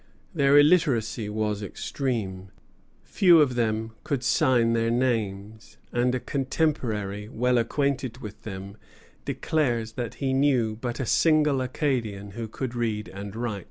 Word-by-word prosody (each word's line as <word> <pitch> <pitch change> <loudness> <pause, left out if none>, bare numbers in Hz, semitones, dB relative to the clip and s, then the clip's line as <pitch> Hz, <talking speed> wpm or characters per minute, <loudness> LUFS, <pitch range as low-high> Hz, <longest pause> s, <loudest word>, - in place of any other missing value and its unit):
Their 140 -3 +4
illiteracy 135 -9 +3
was 105 -1 -2
extreme. 100 -3 -4 0.5
Few 175 -4 +5
of 140 -4 +3
them 110 -2 -1
could 135 -3 -2
sign 120 -2 +3
their 115 0 +1
names, 110 -4 -2
and 125 +1 +1
a - - -1
contemporary 120 -8 -2
well 125 +2 +1
acquainted 130 0 -1
with 105 -5 -9
them 100 0 -8 0.5
declares 120 -8 -1
that 120 -1 -5
he 135 -2 -1
knew 130 -5 +2
but 120 +3 -5
a 130 - -1
single 150 0 +3
Acadian 120 -7 -2
who 115 +3 -5
could 125 +3 -5
read 110 -3 -2
and 100 +1 -8
write. 115 -3 -3
120 Hz, 135 wpm, -26 LUFS, 110-135 Hz, 0.5 s, Few